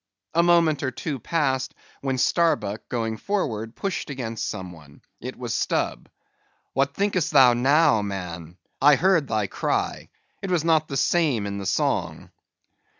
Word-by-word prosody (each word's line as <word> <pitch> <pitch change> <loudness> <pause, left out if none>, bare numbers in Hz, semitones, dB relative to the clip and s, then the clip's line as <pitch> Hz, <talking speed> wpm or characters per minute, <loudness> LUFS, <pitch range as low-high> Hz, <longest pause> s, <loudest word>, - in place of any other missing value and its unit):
A 170 - +4
moment 170 -3 +3
or 130 - 0
two 135 +2 -5
passed, 130 -1 -1 0.3
when 135 -1 -1
Starbuck, 120 - +1
going 115 -2 -2
forward, 115 - -3
pushed 195 -5 -3
against 120 -5 -4
some 95 -1 -5
one. 75 -4 -16 0.2
It - - -7
was - - -4
Stubb. - - -1 0.6
"What 135 +1 0
thinkest 195 -5 0
thou 130 -4 +6
now, 135 0 +4
man; 90 -4 -6 0.2
I 145 +1 +7
heard 170 -2 +2
thy 110 -3 0
cry; - - -2 0.3
it 195 - -4
was 175 -4 +1
not 160 -2 +2
the 135 - -3
same 135 -7 +1
in 100 0 -4
the 100 - -4
song." - - -1
135 Hz, 150 wpm, -24 LUFS, 110-165 Hz, 0.6 s, I